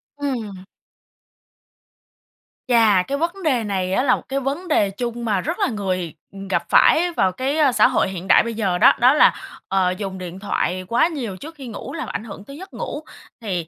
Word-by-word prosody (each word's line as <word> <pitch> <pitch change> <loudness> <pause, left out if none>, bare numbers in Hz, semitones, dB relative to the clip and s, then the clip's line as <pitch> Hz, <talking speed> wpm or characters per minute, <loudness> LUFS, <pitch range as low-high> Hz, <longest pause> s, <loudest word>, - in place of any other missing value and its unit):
Ừm. 230 -10 -4 2.0
Chà, 220 -6 +4
cái 280 +6 -3
vấn 345 +5 -3
đề 260 -7 +1
này 190 -3 -2
á 250 - +2
là 275 - +4
một - - -10
cái 275 +1 -1
vấn 285 +7 -3
đề 205 -10 +2
chung 235 +3 -5
mà 205 -4 0
rất 330 - -4
là 400 - +2
người 185 -6 -3 0.4
gặp - - 0
phải 350 +2 +5
vào 190 - +1
cái, 265 +8 -2
ơ, 295 -4 +4
xã 245 - +5
hội 250 -6 +1
hiện 185 0 -7
đại - - +6
bây 230 0 -4
giờ 195 -5 -1
đó. - - +6
Đó 250 +3 +6
là, 300 - +5 0.3
ờ, 185 -2 +1
dùng 190 -2 -5
điện 180 0 -8
thoại 185 -2 -2
quá 235 +8 +3
nhiều 245 - -5
trước 320 - -10
khi 270 -4 -9
ngủ 230 - -7
làm 325 -1 -5
ảnh 220 - -4
hưởng 200 -3 -10
tới 275 - -10
giấc 380 +4 -11
ngủ. 295 - -5 0.4
Thì 180 -7 -3
230 Hz, 205 wpm, -21 LUFS, 190-280 Hz, 2.0 s, đại